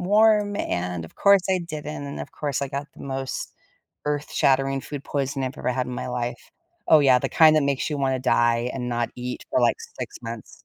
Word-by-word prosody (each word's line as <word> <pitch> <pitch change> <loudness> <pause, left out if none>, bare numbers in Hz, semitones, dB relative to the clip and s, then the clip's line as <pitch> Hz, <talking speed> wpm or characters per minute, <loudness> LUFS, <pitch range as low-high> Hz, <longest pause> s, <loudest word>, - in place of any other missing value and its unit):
warm 205 +1 +4
and 90 - -2
of 80 - -13
course 200 -2 +5
I 185 - +3
didn't 150 -3 -6
and 140 - -6
of - - -8
course 145 -3 -2
I 140 - -2
got 140 +1 -4
the - - -12
most 135 -1 -4 0.5
earth 150 0 -2
shattering 135 0 +2
food 145 -2 -7
poison 140 -1 -2
I've 130 - -4
ever - - -2
had 130 0 -1
in 125 - -5
my - - -4
life. 120 -1 -3 0.5
Oh 160 - +8
yeah, 130 -3 +5
the - - -1
kind 155 -1 +6
that 150 - +4
makes 140 -1 0
you 150 - -1
wanna 130 -1 +1
die 120 -1 +2
and 125 -2 -3
not 120 -1 -1
eat 125 0 -5
for - - +2
like 120 - +3 0.2
6 - - -5
months. 115 -2 -8
135 Hz, 220 wpm, -24 LUFS, 125-150 Hz, 0.5 s, Oh